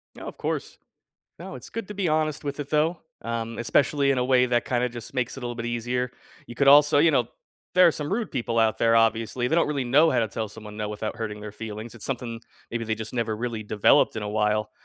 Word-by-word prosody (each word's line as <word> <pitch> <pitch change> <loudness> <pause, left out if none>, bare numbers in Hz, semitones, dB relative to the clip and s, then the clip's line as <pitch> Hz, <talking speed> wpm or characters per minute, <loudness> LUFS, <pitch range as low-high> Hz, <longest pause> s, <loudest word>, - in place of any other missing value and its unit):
No, - - -9
of - - -8
course. - - -3 0.6
No, - - -8
it's - - -10
good 230 -4 -5
to 210 - -7
be 195 -3 -1
honest 155 -1 0
with 140 0 -4
it, 145 -1 -5
though, 155 +3 +1 0.2
um, 115 0 -4
especially 140 +5 +2
in 135 - 0
a 125 - +1
way 125 -1 +4
that 120 -1 +1
kinda 125 0 +1
just 120 0 -9
makes 125 -2 -2
it 135 - -8
a - - -3
little 120 0 -4
bit 115 0 -5
easier. 120 +1 -2 0.4
You 120 - -9
could 140 +3 +2
also, 145 +1 +7
you 160 +2 +5
know - - +2 0.5
there 180 -1 +7
are - - +4
some 150 +1 -5
rude 225 +2 -1
people 115 -1 -1
out 110 -1 +2
there, 115 0 +4
obviously, 115 +2 +1
they 145 - +1
don't 170 - +4
really 140 -3 -1
know 150 +6 +5
how - - +2
to 115 - +1
tell 110 +1 -4
someone 105 -1 -10
"no" 105 -1 -3
without 105 +1 -4
hurting 105 -2 -5
their 105 -1 -8
feelings. 110 +1 -7
It's 115 - -11
something 120 -3 -4 0.3
maybe 115 0 -3
they 110 -1 -1
just 110 +2 -7
never 115 -3 -1
really 115 0 -4
developed 105 +1 +3
in 110 - -3
a - - -3
while. 105 -1 0
120 Hz, 255 wpm, -25 LUFS, 110-140 Hz, 0.6 s, also